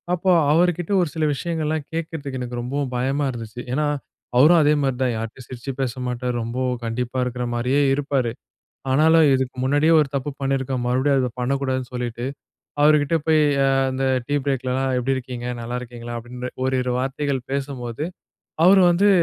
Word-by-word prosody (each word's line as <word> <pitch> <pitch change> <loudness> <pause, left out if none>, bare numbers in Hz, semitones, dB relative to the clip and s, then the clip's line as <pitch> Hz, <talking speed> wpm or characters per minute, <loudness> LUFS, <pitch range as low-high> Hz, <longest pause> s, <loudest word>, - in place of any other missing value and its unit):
அப்போ 185 +2 +1 0.2
அவர்கிட்ட 175 +2 +2
ஒரு 170 - 0
சில 160 - -1
விஷயங்கள்லாம் 155 -1 -2
கேட்கிறதுக்கு 155 -5 -4
எனக்கு 120 -1 -4
ரொம்பவும் 130 +1 -3
பயமா 135 +3 0
இருந்துச்சு. 115 0 -7
ஏன்னா, 150 +2 +1 0.5
அவரும் 160 +7 +7
அதே 150 +1 +4
மாரி 135 -2 0
தான், 125 -2 +1
யார்ட்டயும் 115 +3 -7
சிரிச்சி 130 +2 -6
பேச 125 -3 -1
மாட்டாரு. 125 0 -2
ரொம்ப 115 +3 -4 0.3
கண்டிப்பா 120 +2 -3
இருக்கற 125 0 -3
மாரியே 125 +4 +1
இருப்பாரு. 135 -4 0 0.6
ஆனாலும், 160 +3 +5
இதுக்கு 130 -1 -1
முன்னாடியே 145 +4 +3
ஒரு 150 - +1
தப்பு 140 +1 -1
பண்ணியிருக்கோம், 135 -2 -1
மறுபடியும் 130 +3 +2
அத 125 - 0
பண்ணக்கூடாதுன்னு 130 -1 -1
சொல்லிட்டு, 120 -1 -3 0.6
அவருகிட்ட 150 +1 +4
போயி 155 -1 +5 0.2
அ - - +3 0.2
அந்த 130 +1 -2 0.2
டீ 145 - 0
பிரேக்லலாம், 130 -1 0
"எப்படி 135 +2 0
இருக்கீங்க? 125 -1 -6
நல்லா 120 +2 -4
இருக்கீங்களா?" 120 -1 -7
அப்படின்ற 125 +2 -7 0.2
ஓரிரு 130 -1 0
வார்த்தைகள் 135 +1 -1
பேசும்போது, 135 -2 -3 0.6
அவரு 190 +1 +7
வந்து 190 +4 +3
130 Hz, 155 wpm, -22 LUFS, 125-145 Hz, 0.6 s, அவரும்